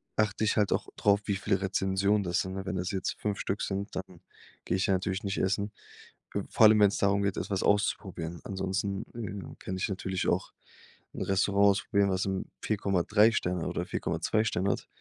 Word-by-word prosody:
achte 110 Hz, 0 st, +1 dB
ich 105 Hz, -, +1 dB
halt 105 Hz, -2 st, +3 dB
auch -, -, -1 dB
drauf, 100 Hz, 0 st, +3 dB
wie 100 Hz, -, 0 dB
viele 95 Hz, -1 st, 0 dB
Rezensionen 95 Hz, +1 st, +1 dB
das 90 Hz, 0 st, +1 dB
sind, 95 Hz, -, -4 dB
ne? 95 Hz, -, -5 dB
Wenn 95 Hz, -, -3 dB
das 90 Hz, +3 st, -2 dB
jetzt 95 Hz, -2 st, -2 dB
5 105 Hz, -1 st, -1 dB
Stück 100 Hz, -, -2 dB
sind, 100 Hz, +1 st, -3 dB
dann 90 Hz, -2 st, -6 dB, 0.5 s
gehe -, -, 0 dB
ich 95 Hz, -, +1 dB
ja 95 Hz, -, +3 dB
natürlich 95 Hz, +1 st, -1 dB
nicht 100 Hz, 0 st, -2 dB
essen. 100 Hz, +2 st, 0 dB, 0.6 s
Äh, -, -, +1 dB
vor 110 Hz, -, +5 dB
allem, 105 Hz, 0 st, +5 dB
wenn's 100 Hz, -1 st, +5 dB
darum 100 Hz, 0 st, +2 dB
geht, 100 Hz, -2 st, 0 dB
etwas 100 Hz, -2 st, -2 dB
auszuprobieren. 95 Hz, -4 st, 0 dB
Ansonsten, 95 Hz, 0 st, -2 dB
äh, 110 Hz, -5 st, -4 dB
ja, -, -, -10 dB
kann 95 Hz, -, -5 dB
ich 95 Hz, -, 0 dB
natürlich 95 Hz, -1 st, -2 dB
auch -, -, 0 dB, 0.6 s
'n -, -, -6 dB
Restaurant 100 Hz, +1 st, +3 dB
ausprobieren, 100 Hz, 0 st, +2 dB
was 95 Hz, 0 st, 0 dB
m 95 Hz, -1 st, -2 dB, 0.2 s
4,3 105 Hz, +1 st, +3 dB
Sterne 90 Hz, -5 st, -1 dB
oder -, -, -2 dB
4,2 110 Hz, 0 st, 0 dB
Sterne 100 Hz, -3 st, 0 dB
hat. -, -, -4 dB
100 Hz, 200 wpm, -29 LUFS, 95-100 Hz, 0.6 s, vor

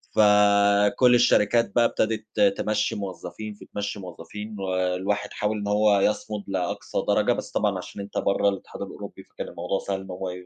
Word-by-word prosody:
فكلّ 105 Hz, +3 st, +5 dB
الشركات 115 Hz, -2 st, +3 dB
بقى 120 Hz, -1 st, +5 dB
ابتدت 110 Hz, -, -1 dB, 0.2 s
تمشّي 105 Hz, 0 st, 0 dB
موظّفين 100 Hz, +2 st, -6 dB
في -, -, -14 dB
تمشّي 105 Hz, 0 st, -5 dB
موظّفين، 100 Hz, +4 st, -8 dB
والواحد 95 Hz, +1 st, -1 dB
حاول 105 Hz, +1 st, -1 dB
إن 100 Hz, -1 st, -4 dB
هو 105 Hz, 0 st, +3 dB
يصمُد 105 Hz, +1 st, -1 dB
لأقصى 95 Hz, -2 st, -2 dB
درجة، -, -, +3 dB
بس -, -, -6 dB
طبعًا 100 Hz, -2 st, 0 dB
عشان 90 Hz, +2 st, -8 dB
أنت 100 Hz, -, -7 dB
برّه 100 Hz, +1 st, +2 dB
الاتحاد 100 Hz, -1 st, -7 dB
الأوروبي -, -, -8 dB
فكان -, -, -8 dB
الموضوع 95 Hz, +2 st, -3 dB
سهل 95 Hz, -1 st, -3 dB
إن 95 Hz, -, -9 dB
هُم 90 Hz, -, -7 dB
م 95 Hz, -, -2 dB
100 Hz, 165 wpm, -25 LUFS, 95-105 Hz, 0.2 s, فكلّ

